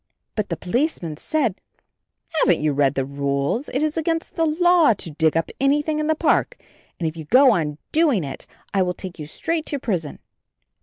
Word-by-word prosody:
But 215 -2 -2
the 170 - -2
Policeman 180 - -1
said, 240 - -1 0.8
"Haven't 175 - +4
you 150 -1 +1
read 140 -1 +2
the 135 - 0
rules? 140 - -1
It 265 +4 -1
is 310 +1 -1
against 325 +1 -1
the 325 -1 +1
law 340 -3 +4
to 170 -5 -7
dig 160 +1 +1
up 165 - -1
anything 295 +3 +1
in 305 - -1
the 315 - +2
park 420 +10 +1 0.4
and 165 - 0
if 160 - -4
you 160 -2 -8
go 255 - +6
on 150 -7 -1
do 320 -1 +4
ing 200 - +1
it 135 -2 -7 0.3
I 195 - +2
will 180 -1 0
take 185 -3 -8
you 150 - -6
straight 320 - -2
to 285 - -2
prison." 180 - -3
205 Hz, 200 wpm, -22 LUFS, -, 0.8 s, go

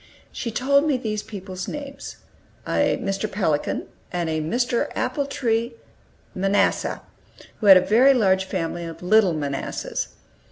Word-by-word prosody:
She 235 - -4
told 280 +6 +2
me 285 -4 +2
these 215 -4 -3
people's 190 -3 -7
names 280 -1 -7 0.5
a - - +2
"Mr. 195 +2 -3
Pelican," 160 -7 -1 0.3
and 175 -2 -2
a 155 0 -1
"Mr. 240 +9 0
Apple 285 -2 -1
tree 235 -3 -1 0.6
Manasseh," 195 +2 +1 0.6
who 215 - -1
had 190 -1 +11
a - - +4
very 250 +8 +5
large 190 -5 +3
family 175 -2 -3
of 165 0 -8
little 195 -1 +4
"Manassehs." 145 -3 -3
205 Hz, 135 wpm, -23 LUFS, 180-245 Hz, 0.6 s, had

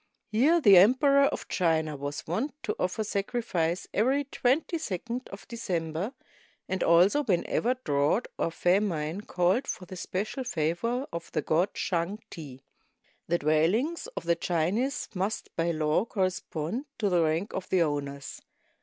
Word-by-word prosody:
Here 285 +11 +4
the 205 - +7
Emperor 275 +8 +6
of - - -2
China 160 -4 +1
was 145 +1 -5
wont 225 - -2
to 215 -5 -2
offer 185 +4 -1
sacrifice 195 -5 -1
every 265 +7 +2
twenty 280 +5 0
second 235 - -4
of 200 - -10
December, 180 - -3 0.5
and 190 0 -2
also 180 - +5
whenever 235 +2 +1
drought 145 - +1
or - - +1
famine 175 -1 0
called 190 +8 +1
for 180 - -4
the 185 - -9
special 205 +8 -3
favor 230 - -1
of 170 - -6
the 155 - 0
god 170 +7 +2
Shang 175 +3 -1
ti. 135 -5 -9 0.6
The 175 - +2
dwellings 170 - +1
of - - -3
the 170 0 +2
Chinese 180 - 0
must 200 +3 -3
by 165 0 +1
law 155 +4 +1
correspond 185 - -2
to 215 - 0
the 175 -2 +3
rank 165 +6 0
of 190 -1 -5
the 185 -2 +4
owners. 140 -2 -4
185 Hz, 145 wpm, -28 LUFS, 165-230 Hz, 0.6 s, the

